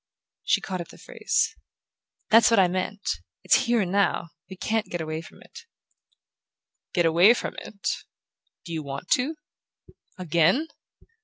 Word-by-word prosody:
She - - +2
caught 185 -2 -4
at 170 - -8
the - - -14
phrase. 450 0 -1 0.8
"That's 225 0 +7
what 230 -3 +4
I 185 - +6
meant: 185 +3 -4 0.4
it's 265 - +4
here 235 -1 +3
and 180 -2 -2
now; 195 -4 +1 0.2
we 190 - -8
can't 220 +3 -1
get 175 - -3
away 155 0 -4
from - - -15
it." - - -14 1.2
"Get 175 -2 +2
away 175 +8 +6
from - - -4
it? 200 - -8 0.8
Do 170 - -6
you 160 - -2
want 140 +4 -7
to? 275 +6 +1 0.8
AGAIN?" 180 - +2
185 Hz, 150 wpm, -25 LUFS, 170-225 Hz, 1.2 s, That's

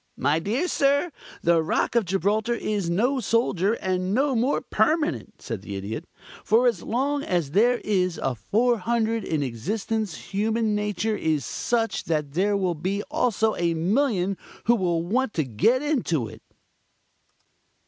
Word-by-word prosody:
"My 145 +4 +2
dear 235 - -1
sir, 285 +2 +2 0.3
the 170 -1 +4
Rock 160 - 0
of 235 -3 +2
Gibraltar 205 +6 0
is 205 -6 -2
no 245 +10 +1
solider 210 -4 +1
and 185 -1 -1
no 275 +2 +2
more 245 +5 +2
permanent," 300 -1 0
said 115 -6 -4
the 100 0 -7
Idiot. 105 - -5 0.4
"For 230 +4 +3
as 230 -8 +2
long 280 +5 -1
as 175 - -1
there 235 +8 +4
is 185 -4 0
a 135 - -1
400 225 - 0
in 155 -3 -1
existence 195 - -2 0.2
human 220 +2 +1
nature 210 +1 -1
is 155 - 0
such 225 - -1
that 150 -3 -1
there 200 +6 +1
will 180 -5 -1 0.3
also 225 -8 +1
be - - -5
a 170 -1 +2
million 195 - +1 0.3
who 235 - +4
will 175 -6 0
want 230 +6 -1
to 155 - +1
get 185 - +2
into 220 - 0
it." - - -12
210 Hz, 150 wpm, -25 LUFS, 170-235 Hz, 0.4 s, the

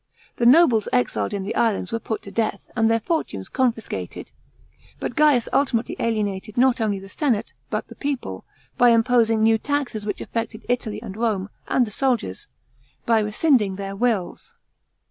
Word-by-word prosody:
The 235 - +3
noble 255 -5 +6
exiles 110 -4 0
in 200 -1 -3
the 200 - -3
islands 220 -5 +1
were 230 - -1
put 220 -1 -4
to 200 - -9
death, 225 +1 -2
and 225 -1 +3
their 225 0 +3
fortunes 225 - -3
confiscated. 240 -4 -2 0.7
But - - -4
Ga'us 300 -6 +4
ultimately 250 -4 +1
alienated 210 -2 -2
not 250 -1 +3
only 210 -2 0
the 195 0 -10
senate, 230 -1 -1 0.2
but - - -3
the - - -11
people, 260 - -4 0.4
by 245 - +7
imposing 230 -1 +3
new 225 0 +4
taxes 280 -5 -2
which 205 - -2
affected 230 -1 -4
Italy 225 -4 -1
and 195 -4 -7
Rome, 210 -3 -1 0.2
and 250 - +2
the 215 - -8
soldiers, 235 - -1 0.6
by 230 -1 +4
rescind 225 +6 +3
ing 195 -2 -3
tl>eir 195 0 -5
wills. 220 -4 -2
225 Hz, 165 wpm, -23 LUFS, 205-245 Hz, 0.7 s, by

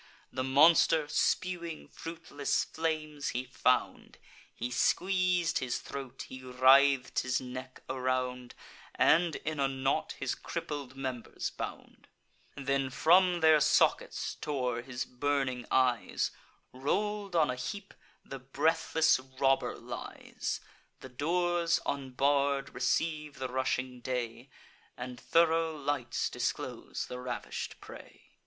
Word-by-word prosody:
The 130 - -1
monster, 155 +3 +5
spewing 170 +1 -1
fruitless 165 -3 -2
flames, 155 -3 -2
he 125 - -2
found; 125 0 0 0.4
He 120 - -3
squeez'd 180 +4 +2
his 125 -2 -2
throat; 135 -2 -7
he 130 - -9
writh'd 130 +1 +4
his 125 -1 0
neck 130 0 -8
around, 125 -1 -2 0.4
And 165 0 +4
in 155 -1 -4
a 135 - +3
knot 135 0 -1
his - - -2
crippled 140 -3 -5
members 130 -3 -4
bound; - - -8 0.5
Then 135 -1 0
from 175 +5 +4
their 160 -1 +6
sockets 155 +1 +2
tore 125 -5 -1
his 125 0 -4
burning 130 -1 -1
eyes: 125 -2 +1 0.4
Roll'd 200 +8 -1
on 155 -5 +4
a - - -3
heap, 195 +11 -6 0.3
the 135 - -7
breathless 155 +3 +2
robber 135 +1 0
lies. - - -5 0.4
The 130 - -9
doors, 170 +5 +1
unbarr'd, 140 +1 0
receive 150 -3 -1
the 130 -1 -3
rushing 130 0 -1
day, 125 0 -4 0.5
And 125 0 -6
thoro' 165 0 +2
lights 140 -4 -1
disclose - - -3
the 125 - -7
ravish'd 125 -1 -5
prey. - - -12
135 Hz, 115 wpm, -31 LUFS, 130-160 Hz, 0.5 s, their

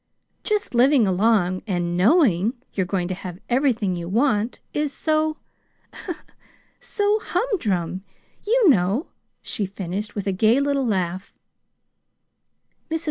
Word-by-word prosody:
Just 420 - -1
living 250 0 +5
along 190 -1 +2
and 175 -3 -1
KNOWING 220 - +3 0.2
you're 190 -3 -1
going 185 -2 -1
to - - -1
have 180 -1 -7
everything 240 -7 +1
you 170 0 -5
want 225 0 +1
is 295 -1 -1
so 310 +2 0 1.4
so 415 +1 0
humdrum, 195 - -1 0.4
you 460 0 +3
know," 210 - +2 0.3
she 205 - -3
finished, 195 +2 -5
with 205 - -3
a 195 - +1
gay 220 +7 +3
little 280 -2 0
laugh. 185 -2 -2
210 Hz, 115 wpm, -23 LUFS, 185-285 Hz, 1.4 s, living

